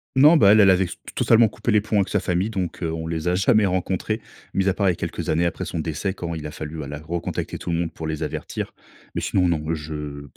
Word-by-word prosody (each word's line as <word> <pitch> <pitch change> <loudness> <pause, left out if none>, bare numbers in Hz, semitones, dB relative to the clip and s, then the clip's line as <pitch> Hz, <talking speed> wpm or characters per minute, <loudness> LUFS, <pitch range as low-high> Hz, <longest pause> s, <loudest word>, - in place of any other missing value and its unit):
Non, 150 +5 +7
bah, 100 -7 +7
elle 110 - +6
elle 100 -2 +7
avait 95 0 +3
s 85 - -7 0.2
totalement 115 0 +5
coupé 115 - -3
les 105 -1 +4
ponts 105 0 -1
avec 95 -2 +2
sa - - +1
famille, 90 +4 0
donc 95 -6 -3
heu, 85 -2 -1
on 80 0 -4
les 80 0 -3
a 90 - +2
jamais 100 +3 +4
rencontrés 95 +4 -1 0.3
mis 95 0 +2
à 95 - +3
part 100 -1 +1
les 90 - +3
quelques - - -4
années 85 +2 +2
après 85 - -2
son 85 - -4
décès, 80 +5 -2
quand 85 -3 -4
il 75 -2 -5
a - - -7
fallu 75 0 -6
ala 75 +1 -6
recontacter 85 +2 -4
tout - - -6
le 85 - +1
monde 85 -1 -2
pour 80 - -5
les 80 -1 -3
avertir - - -4 0.4
mais - - -2
sinon, 90 -2 +2
non, 80 -3 0
je 75 -2 -6
90 Hz, 260 wpm, -23 LUFS, 80-100 Hz, 0.4 s, Non